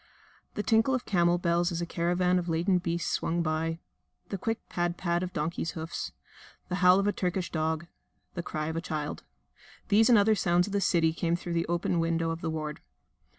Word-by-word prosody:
The 210 - -2
tinkle 225 +4 +3
of 255 - -3
camel 175 -2 +3
bells 175 0 +1
as 170 - -2
a 170 - -1
caravan 180 +1 +1
of 175 -1 -4
laden 175 +3 +2
beasts 170 -1 -2
swung 170 +1 0
by, 160 +1 -1 0.5
the 195 - -3
quick 225 +3 -3
pad 175 0 -1
pad 175 -1 0
of 185 -1 -3
donkeys' 165 0 -2
hoofs, 160 +1 -4 0.6
the 180 - -1
howl 180 +1 +7
of 200 - +1
a 205 - +3
Turkish 180 0 -2
dog, 160 0 -1 0.5
the 175 - -3
cry 155 -2 -4
of 160 +1 -3
a 165 - -1
child 155 -4 -4 0.7
these 220 +2 +5
and 235 - +7
other 205 +2 +5
sounds 175 -3 +2
of 200 - -7
the 200 - +1
city 165 -4 +3
came 170 0 0
through 175 0 -5
the 170 0 0
open 175 0 0
window 165 0 0
of 165 +1 -5
the 165 - -2
ward. 155 -1 -4
175 Hz, 205 wpm, -29 LUFS, 165-185 Hz, 0.7 s, howl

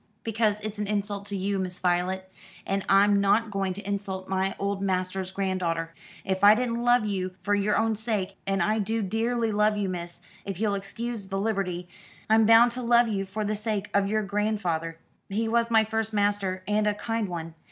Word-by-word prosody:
"Because 220 -2 +1
it's 215 0 -5
an 210 - -2
insult 205 -1 -2
to 205 - -3
you, 195 +1 -1
Miss 180 -1 -4
Voylet; 180 +1 0 0.4
and 195 0 -1
I'm 200 +1 +5
not 210 +3 +2
going 195 -1 -1
to 200 +1 -7
insult 195 -2 -3
my 190 0 0
old 200 0 -2
master's 185 -1 -1
granddaughter. 185 -4 -2 0.3
If 190 0 -2
I 205 +1 +9
didn't 235 0 -1
love 240 -2 +4
you 185 -3 -2
for 205 - +1
your 205 +1 +2
own 225 0 +1
sake 205 -3 -2
and 195 0 +1
I 215 +1 +1
do 220 +2 -1
dearly 225 +3 0
love 210 0 +2
you, 200 -2 -1
miss, 175 -1 -6 0.2
if 195 -2 -5
you'll 210 -2 +1
excuse 205 +2 -5
the 195 0 -2
liberty 195 -4 -2 0.4
I'm 220 -1 +5
bound 230 +2 +7
to 250 +2 -5
love 235 -1 +4
you 195 -2 -1
for 210 +3 -3
the 215 +1 -1
sake 210 -1 -3
of 200 -1 +3
your 215 +1 0
grandfeyther. 200 -6 -1 0.3
He 220 +3 -1
was 230 +1 +1
my 225 -1 +5
first 220 0 -2
master, 200 -2 0
and 210 0 +2
a 210 - +1
kind 225 -1 -2
one. 165 -2 -5
205 Hz, 200 wpm, -27 LUFS, 190-220 Hz, 0.4 s, I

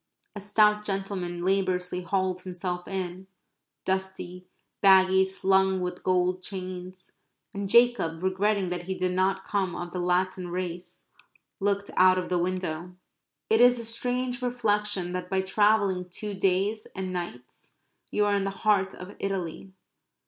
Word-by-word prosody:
A - - -5
stout 210 +1 +3
gentleman 195 -3 -3
laboriously 185 -2 0
hauled 185 0 -1
himself 180 -1 -5
in, 190 -1 -4 0.6
dusty, 190 -1 -3 0.3
baggy, 190 -1 +6
slung 190 0 +2
with 180 0 -4
gold 185 0 +1
chains, 185 -1 -6 0.4
and 200 0 -4
Jacob, 220 -8 +3
regretting 190 0 +1
that 175 -1 -3
he 190 - -2
did 185 0 0
not 190 +1 +1
come 190 -4 -1
of 175 0 -5
the 180 - -4
Latin 180 +1 0
race, 175 0 -5 0.5
looked 200 0 0
out 185 0 +6
of 185 - -2
the 180 -1 +1
window. 180 -1 -3 0.5
It 220 +1 +4
is 245 0 +7
a 230 - -6
strange 245 +2 -1
reflection 210 -6 0
that 180 0 -4
by 190 0 +1
travelling 195 -2 +2
two 205 +3 -5
days 195 +3 0
and 185 -1 -4
nights 170 -9 -7 0.3
you 210 - +1
are 205 - +2
in 200 -1 +1
the 195 - -1 0.2
heart 195 -2 +3
of 180 +3 -10
Italy. 190 -1 -4
190 Hz, 145 wpm, -27 LUFS, 180-200 Hz, 0.6 s, is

